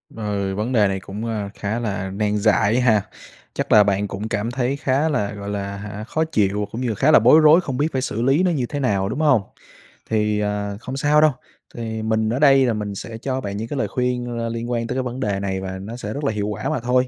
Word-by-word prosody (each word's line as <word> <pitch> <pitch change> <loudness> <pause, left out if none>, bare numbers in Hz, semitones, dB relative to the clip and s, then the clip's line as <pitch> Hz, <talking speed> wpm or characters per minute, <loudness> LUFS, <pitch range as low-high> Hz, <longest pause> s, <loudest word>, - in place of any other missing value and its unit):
Ừ, 100 -3 -2
vấn 110 +5 -2
đề 105 -4 +4
này 95 0 -2
cũng, 100 +3 -7
ơ, 105 -3 -3
khá 105 +3 -3
là 100 -4 -3
nan 105 +1 0
giải 110 +2 +3
ha. 110 -4 +4 0.5
Chắc - - -3
là 105 -1 +8
bạn 100 0 0
cũng 105 +3 -5
cảm 115 +3 -2
thấy 130 +1 -1
khá 140 +4 +1
là, 105 -8 -1
gọi 100 0 -7
là, 100 -1 -4
hả, 105 +1 -7
khó 155 +7 -1
chịu 105 0 +1
cũng 115 - -5
như 115 -4 -1
khá 145 +9 +3
là - - +8
bối 125 +8 +7
rối 155 +3 +6
không 135 -6 -4
biết 150 +2 +2
phải 130 - 0
xử 115 -3 -3
lý 135 +8 +3
nó 180 - +2
như 130 -6 0
thế 145 - -3
nào, 100 -6 0
đúng 135 - -3
hông? 145 -8 +4 0.7
Thì, 105 -1 +1
ờ, 105 -1 -2
không 130 +1 -5
sao 150 +2 +3
đâu, 155 -1 +5 0.4
thì 110 -2 -4
mình 110 0 0
ở 125 +4 -1
đây 135 -3 +6
là 120 - +1
mình 105 -2 -4
sẽ 110 +3 -7
cho 130 +2 -3
bạn 100 -3 -4
những 110 +2 -4
cái 145 - -4
lời - - 0
khuyên, 125 -1 -2
ơ, 115 0 -2
liên 115 +1 -4
quan 115 -1 -1
tới 125 - -3
cái 130 - 0
vấn 125 +1 -5
đề 100 -6 -1
này 95 -1 -2
và 95 0 -5
nó 110 +4 -7
sẽ 105 -3 -5
rất 145 - -5
là 140 - +1
hiệu 105 -1 -2
quả 105 0 -3
mà - - -1
thôi, 125 +2 +1
110 Hz, 265 wpm, -21 LUFS, 105-130 Hz, 0.7 s, là